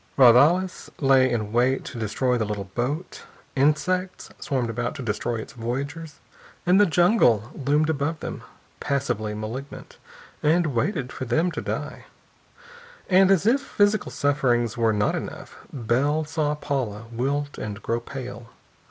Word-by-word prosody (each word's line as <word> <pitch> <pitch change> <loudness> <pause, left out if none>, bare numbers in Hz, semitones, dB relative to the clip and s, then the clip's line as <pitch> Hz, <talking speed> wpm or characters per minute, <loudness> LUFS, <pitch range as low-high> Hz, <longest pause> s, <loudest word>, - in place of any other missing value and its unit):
Raudales 145 +9 +5
lay 135 -2 +4
in 110 -3 -2
wait 125 +3 +1
to 130 -3 -7
destroy 125 +4 0
the 115 - 0
little 105 -1 -3
boat. 125 - -4 0.3
Insects 180 +7 0
swarmed 130 -7 -1
about 120 +6 -3
to 140 - -6
destroy 115 +1 -2
its 115 +5 -7
voyagers. 140 +6 -4 0.5
And 185 +3 +5
the 205 - +5
jungle 160 - +3
loomed 145 +3 +1
above 155 +1 -1
them, - - -6 0.4
passively 120 -6 -2
malignant, 115 +6 -7 0.4
and 160 -1 +2
waited 130 - -1
for 130 - -5
them 160 +9 +1
to - - -4
die. - - -5 1.1
And 190 +1 +6
as 195 -1 +3
if 255 +5 +3
physical 205 -4 +1
sufferings 125 -5 +1
were 115 -2 +2
not 105 -1 +1
enough, - - -6 0.2
Bell 140 +5 0
saw 150 -1 -1
Paula 125 -8 -3
wilt 140 +4 -2
and 105 -1 -5
grow 115 0 -1
pale. 120 -2 -8
135 Hz, 145 wpm, -24 LUFS, 120-155 Hz, 1.1 s, And